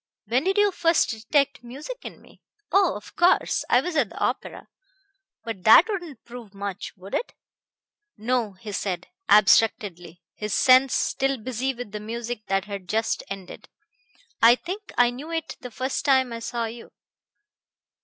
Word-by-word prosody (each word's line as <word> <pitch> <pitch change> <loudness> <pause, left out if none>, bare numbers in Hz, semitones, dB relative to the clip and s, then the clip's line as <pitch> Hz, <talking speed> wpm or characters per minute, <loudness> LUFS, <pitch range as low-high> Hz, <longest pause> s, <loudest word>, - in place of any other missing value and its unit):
"When 245 - 0
did 385 +2 +1
you 410 -1 +4
first 335 -2 +2
detect 275 +4 0
music 280 - -8
in - - -9
me? - - -20 0.3
Oh, 390 -2 +3
of 205 - -11
course! 350 +2 +3
I - - +5
was 360 -2 -4
at 265 -9 +2
the - - -13
opera. - - -3 0.8
But 225 -5 -6
that 225 - +8
wouldn't 350 - -6
prove 235 -4 -11
much, 200 -1 -5
would 190 +2 -12
it?" - - -2 0.8
"No," 225 -1 -1
he 205 +3 -9
said, 190 -2 -3 0.2
abstractedly, 190 -4 +3
his 210 -1 -3
sense 255 0 +5
still 270 0 0
busy 255 +3 -3
with 240 -4 -8
the 210 - -5
music 230 +1 -6
that 195 0 0
had 200 -2 -7
just 220 +1 0
ended. 195 -2 -9 0.7
"I 235 +1 +8
think 370 +8 -7
I 245 0 +5
knew 275 +6 -9
it 325 -1 -4
the 250 - -8
first 260 +3 -3
time 260 -3 +3
I 230 - -5
saw 235 0 -3
you." 230 +1 -9
240 Hz, 165 wpm, -24 LUFS, 210-275 Hz, 0.8 s, that